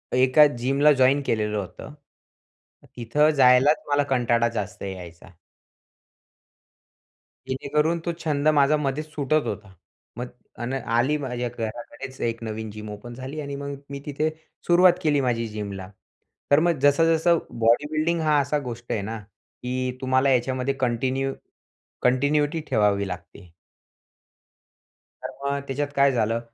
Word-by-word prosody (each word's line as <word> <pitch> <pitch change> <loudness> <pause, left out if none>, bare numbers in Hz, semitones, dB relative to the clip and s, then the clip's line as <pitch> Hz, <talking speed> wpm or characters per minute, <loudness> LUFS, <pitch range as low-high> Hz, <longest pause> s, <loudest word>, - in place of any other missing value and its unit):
एका 130 +4 +6
जिमला 140 +4 +3
जॉइन 135 +2 +3
केलेलं 105 -1 0
होतं. 100 +8 -7 1.0
तिथं 145 +7 +2
जायलाच 130 +3 +5
मला 145 0 +3
कंटाळा 120 -2 +2
जास्त 105 -3 -5
यायचा. 90 -2 -8 2.2
जेणेकरून 150 +5 0
तो 170 - 0
छंद 150 -1 0
माझा 150 0 +4
मध्येच 150 +2 -2
सुटत 150 +1 0
होता. 105 -2 -6 0.4
मग 125 +1 -4 0.3
आणि 125 +3 -2 0.2
आली 145 +5 +2
माझ्या 125 -3 -3
घराकडेच 120 +4 -6
एक 115 0 -2
नवीन 110 0 -5
जिम 105 0 -8
ओपन 120 +4 -9
झाली 130 +5 -7
आणि 140 -1 -5
मग 140 0 -5
मी 140 0 -6
तिथे 150 +2 -1 0.4
सुरुवात 175 +1 +6
केली 145 -2 +2
माझी 115 -2 0
जिमला. 100 -3 -6 0.6
तर 145 - +7
मग 170 -3 +1
जसं-जसं 165 +3 +4 0.2
बॉडीबिल्डिंग 155 +8 +2
हा 155 -1 +3
असा 145 +1 0
गोष्ट 120 0 -8
आहे 105 - 0
ना, 110 +2 -5
की 125 +4 -6
तुम्हाला 130 +1 +2
याच्यामध्ये 130 +1 +1
कंटिन्यू 130 +2 0 0.7
कंटिन्यूटी 145 +5 +2
ठेवावी 100 -2 +2
लागते. 90 -1 -9 1.7
तर - - -4 0.2
मग 140 0 0
त्याच्यात 140 +2 -2
काय 140 0 +5
झालं 115 -2 0
130 Hz, 130 wpm, -24 LUFS, 115-145 Hz, 2.2 s, तर